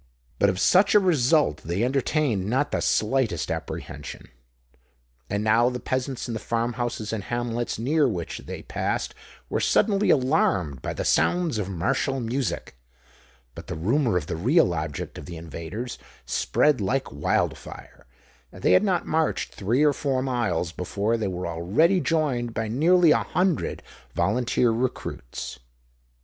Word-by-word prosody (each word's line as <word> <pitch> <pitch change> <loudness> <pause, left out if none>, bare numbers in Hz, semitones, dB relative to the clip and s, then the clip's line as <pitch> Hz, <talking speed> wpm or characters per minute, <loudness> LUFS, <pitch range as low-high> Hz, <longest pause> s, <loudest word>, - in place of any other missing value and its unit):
But 100 - +4
of 95 - -1
such 195 - +4
a - - +9
result 155 - +3
they 85 +7 -2
entertained 130 -5 0
not 135 +5 +1
the - - 0
slightest 110 - +1
apprehension. 75 0 -6 1.0
And 100 +1 -1
now 115 +3 +4
the 125 0 -4
peasants 130 +1 -3
in 120 - -4
the 110 - -3
farm 115 +2 -1
houses 115 -3 -3
and 105 -3 -3
hamlets 120 0 -2
near 145 +6 +2
which 90 -8 -4
they - - -6
passed, - - -2 0.3
were - - -1
suddenly 205 -1 +2
alarmed 95 - +2
by - - -3
the - - -4
sounds 175 -10 +2
of 100 -2 -3
martial 100 +9 0
music: 120 - -3 0.8
but - - -10
the - - -4
rumour 115 - +1
of 75 - -2
the 80 - -4
real 120 - +3
object 80 -3 -4
of - - -10
the 85 -2 -7
invaders 85 +9 -6 0.3
spread 150 -6 +2
like 130 +7 -1
wild 70 +2 0
fire; - - -12 0.4
and - - -13
they - - +4
had 90 - +6
not 190 -4 +1
marched 160 0 0
three 115 +8 +1
or 150 -1 +4
four 135 -2 -1
miles, 115 -10 -1
before 100 +6 -1
they 110 -3 -1
were 90 -1 -4
already 100 - +2
joined 135 -9 0
by 110 0 -1
nearly 165 +8 +4
a - - +6
hundred 180 -3 -1 0.3
volunteer 120 +6 +2
recruits. 115 - -4
120 Hz, 155 wpm, -25 LUFS, 95-140 Hz, 1.0 s, a